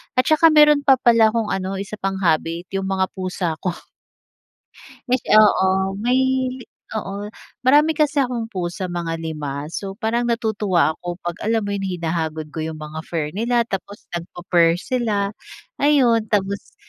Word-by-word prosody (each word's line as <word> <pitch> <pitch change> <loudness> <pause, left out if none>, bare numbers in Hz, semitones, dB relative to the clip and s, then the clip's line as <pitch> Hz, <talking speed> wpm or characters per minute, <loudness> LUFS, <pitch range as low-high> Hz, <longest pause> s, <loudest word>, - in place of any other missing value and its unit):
at 255 - +4
saka 315 +1 +6
meron 300 -1 +6
pa 270 -2 +7
pala 230 -3 +5
kong 225 -2 -1
ano, 195 0 -2
isa 200 +2 -5
pang 195 0 -2
habit, 165 +1 0
yung 195 0 -2
mga 190 -1 0
pusa 180 -3 -2
ko. 180 -2 -2 1.3
Yes 255 -1 +1
oo 190 -2 +4
may 245 +4 +1 0.7
oo 200 -2 -4 0.5
marami 295 +4 +5
kasi 295 -1 +2
akong 245 -3 -2
pusa, 185 0 -3
mga 165 -1 -3
5. 150 -3 -5
So 195 +1 -5
parang 235 +1 -1
natutuwa 210 -8 +1
ako 175 +1 -6
pag 175 0 -4
alam 225 0 0
mo 205 - -3
yun, 200 - -3
hinahagod 160 -3 -3
ko 160 - -5
yung 160 0 -4
mga 155 +1 -7
fur 155 -3 -2
nila, 235 +3 +1
tapos 200 0 -6
nag 170 0 -4
pu-purr 170 -1 +3
sila, 210 -3 -1 0.5
ayun. 245 -7 +3
Tapos 200 -1 -2
195 Hz, 155 wpm, -21 LUFS, 170-230 Hz, 1.3 s, pa